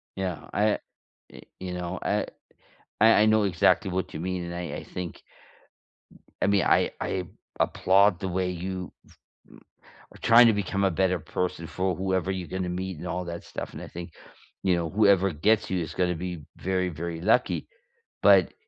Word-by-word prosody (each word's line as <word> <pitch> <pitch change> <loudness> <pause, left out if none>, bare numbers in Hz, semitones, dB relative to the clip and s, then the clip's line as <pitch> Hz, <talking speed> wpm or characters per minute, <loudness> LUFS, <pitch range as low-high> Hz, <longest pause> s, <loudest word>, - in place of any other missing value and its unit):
Yeah. 95 -3 -4
I 105 0 +2 0.5
y - - -12 0.2
you 90 -1 -5
know, 90 +1 -4
I - - 0 0.8
I 110 +1 +8
I - - +5
know 110 0 +4
exactly 95 +1 +2
what 95 0 -3
you 75 - -5
mean, 90 0 -3
and 85 0 -6
I 85 -1 -4
I - - -7
think 90 -2 -7 1.2
I - - +3
mean, 100 -3 +3
I - - +3
I 95 -1 -2 0.4
applaud 95 0 +3
the 95 - -3
way 90 0 -1
you 90 +1 -5 1.2
are - - -15
trying 120 +1 +7
to 115 - +5
become 100 -1 -1
a 95 - +3
better 90 +1 +1
person 90 0 -3
for 95 +2 -1
whoever 95 0 -1
you're 90 -2 -4
gonna 95 -1 -3
meet, 90 -1 -4
and 90 - -7
all 90 +1 -2
that 85 0 -6
stuff, - - -6
and - - -8
I - - -7
think, 85 -1 -8 0.5
you 95 -2 +2
know, 85 -1 -2
whoever 100 -2 +4
gets 105 +8 +2
you, 95 - 0
is 80 -1 -5
gonna 90 -1 0
be 90 -2 -5
very, 95 0 -1
very 85 0 -5
lucky. 115 +6 +2 0.5
But, - - +5
90 Hz, 180 wpm, -26 LUFS, 90-95 Hz, 1.2 s, I